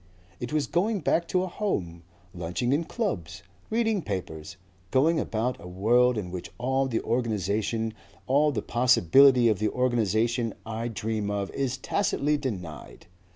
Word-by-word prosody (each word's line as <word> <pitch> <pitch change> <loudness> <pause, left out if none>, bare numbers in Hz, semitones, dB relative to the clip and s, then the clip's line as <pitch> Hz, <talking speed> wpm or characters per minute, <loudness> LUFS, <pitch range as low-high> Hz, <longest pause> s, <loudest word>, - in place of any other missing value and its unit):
It 120 - -5
was 150 -2 +1
going 200 +3 0
back 170 +3 +1
to 185 +1 +1
a - - -2
home, 95 - -3 0.3
lunching 90 +9 -1
in 160 +4 +1
clubs, 100 - -3 0.3
reading 220 -3 +1
papers, 85 - -5 0.3
going 155 - +3
about 115 +3 -2
a - - -9
world 120 +7 +3
in 90 -4 -4
which 90 -1 -6
all 130 +2 0
the 115 -3 -1
organization, 110 -1 -1 0.3
all 145 +3 +3
the 130 - -3
possibility 125 +1 +5
of 110 -4 +2
the 110 0 +1
organization 115 -1 0
I 115 +1 -3
dream 110 -2 -3
of 100 -1 -2
is 130 -2 -2
tacitly 150 -1 0
denied. 90 - -6
120 Hz, 150 wpm, -27 LUFS, 100-140 Hz, 0.3 s, possibility